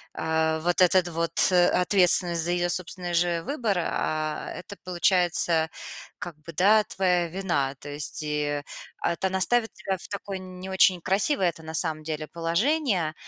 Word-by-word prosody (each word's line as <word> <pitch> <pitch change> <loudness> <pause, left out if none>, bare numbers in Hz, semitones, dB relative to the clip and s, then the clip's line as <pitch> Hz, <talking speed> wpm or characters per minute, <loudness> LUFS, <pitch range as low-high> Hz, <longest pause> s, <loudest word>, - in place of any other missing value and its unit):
а, 160 0 0
вот 175 +2 0
этот 180 0 +4
вот 165 +2 +1
ответственность 180 -1 +5
за 175 - -1
её 175 0 0
собственный 175 0 -2
же 170 -1 0
выбор, 235 -9 -2
а, 155 -1 -3
это 190 +3 -9
получается 175 -2 +1 0.5
как 175 -3 -7
бы, 165 +2 -11
да, 210 +6 +4
твоя 180 -2 0
вина. 170 -7 -2
То 145 - -10
есть 145 +1 -5
и 150 -1 -2 0.4
это 170 +3 0
она 190 0 -2
ставит 235 +3 +2
тебя 195 -2 -4
в - - -10
такое 200 -1 -6
не 185 0 -9
очень 190 -1 +3
красивое-то 190 - 0
на 160 0 -8
самом 155 -2 +3
деле 155 -1 -5
положение. 175 - 0
175 Hz, 155 wpm, -25 LUFS, 160-190 Hz, 0.5 s, ответственность